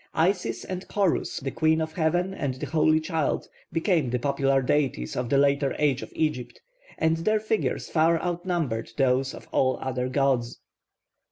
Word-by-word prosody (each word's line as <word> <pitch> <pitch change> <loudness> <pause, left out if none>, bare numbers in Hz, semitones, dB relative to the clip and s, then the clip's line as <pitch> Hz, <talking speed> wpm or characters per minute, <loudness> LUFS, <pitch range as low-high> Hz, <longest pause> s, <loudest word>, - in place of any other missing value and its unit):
Isis 160 - 0
and 185 0 -5
Horus, 200 -4 0
the 135 -1 -4
Queen 160 +2 +2
of 160 0 -3
Heaven 175 +3 0
and 140 -8 -2
the 130 - -5
Holy 155 +2 +3
Child, 160 -1 -1 0.2
became 165 - +1
the 125 - 0
popular 135 0 +1
deities 130 - 0
of 125 -1 -2
the 140 - +3
later 140 0 +2
age 140 -3 +1
of - - -8
Egypt, 150 -6 -2 0.4
and 160 0 +2
their 215 +6 +1
figures 215 0 -1
far 165 +1 +3
outnumber 170 -9 -2
those 135 -1 +2
of - - -12
all 130 0 +2
other 125 -1 -2
gods. 130 -3 0
150 Hz, 165 wpm, -26 LUFS, 130-165 Hz, 0.4 s, Holy